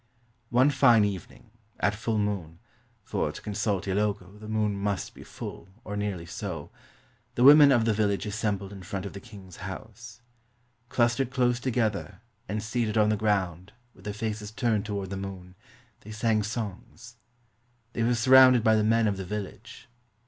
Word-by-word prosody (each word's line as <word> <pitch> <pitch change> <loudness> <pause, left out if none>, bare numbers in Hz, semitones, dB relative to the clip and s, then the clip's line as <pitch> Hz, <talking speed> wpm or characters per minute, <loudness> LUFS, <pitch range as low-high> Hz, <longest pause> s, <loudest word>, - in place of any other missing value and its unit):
One 130 +4 +4
fine 120 -6 +5
evening, 100 +3 -6 0.3
at 105 - +2
full 110 +1 -2
moon 100 -6 -2 0.5
(for, - - -2
to - - -9
consult 105 -2 -2
Ilogo, 100 0 -2
the 110 - -10
moon 110 -1 0
must 100 -1 -3
be - - -13
full, - - -9
or 105 - -6
nearly 100 -4 -3
so), 85 -3 -6 0.6
the 120 - +2
women 145 +1 +9
of 120 -4 +3
the 115 - +2
village 105 -1 0
assembled 105 -2 -2
in 100 - -9
front 95 +1 -5
of 100 - -6
the 100 - -7
king's 100 -5 -13
house. 110 +4 -9 0.7
Clustered 120 +1 +1
close 125 -2 +1
together, 115 -5 -1 0.3
and 105 +1 -2
seated 110 -1 -1
on 105 -1 +4
the 110 - +2
ground, 95 -3 -1 0.2
with 95 - -19
their 105 - -2
faces 105 0 -4
turned 110 -2 -1
toward 100 -2 -4
the 95 - -3
moon, 95 -2 -7 0.5
they 105 - -14
sang 110 0 +1
songs. 115 +2 -6 0.8
They - - -2
were 120 +2 +2
surrounded 130 0 +7
by 110 -1 +4
the 105 - +2
men 115 +1 +3
of 100 -2 -1
the 95 - -4
village. 105 +6 -7
105 Hz, 170 wpm, -27 LUFS, 100-115 Hz, 0.8 s, women